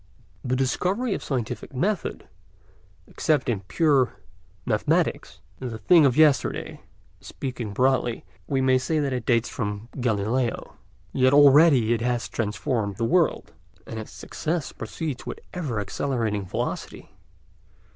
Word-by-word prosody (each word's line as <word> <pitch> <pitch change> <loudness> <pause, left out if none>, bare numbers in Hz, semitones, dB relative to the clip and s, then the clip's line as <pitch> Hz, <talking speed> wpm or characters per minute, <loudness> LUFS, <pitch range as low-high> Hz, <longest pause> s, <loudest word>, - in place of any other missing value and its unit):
The 130 0 0
discovery 185 - 0
of - - -4
scientific 130 -1 -4
method, 195 +8 -2 0.8
except 150 -4 0
in 110 -5 0
pure 130 - +2 0.5
mathematics, - - 0 0.2
is 125 -3 -5
a - - -5
thing 150 - +5
of 125 - 0
yesterday; 150 -5 +2 0.4
speaking 125 -5 -6
broadly, 125 +1 +1 0.2
we 135 -2 0
may 130 0 +4
say 155 +5 -1
that 140 -3 0
it 125 -3 -4
dates 115 -2 +3
from 105 +1 -4
Galileo. 115 +1 -1 0.4
Yet 130 +1 +3
already 140 -4 +6
it 115 - -1
has 120 0 -1
transformed 105 -1 -2
the 115 - 0
world, 170 +5 +1 0.3
and 110 - -6
its 110 - -8
success 160 -2 -4
proceeds 150 -6 -5
with - - -5
ever 145 - -3
accelerating 105 -2 -2
velocity. - - -4
130 Hz, 130 wpm, -25 LUFS, 115-145 Hz, 0.8 s, already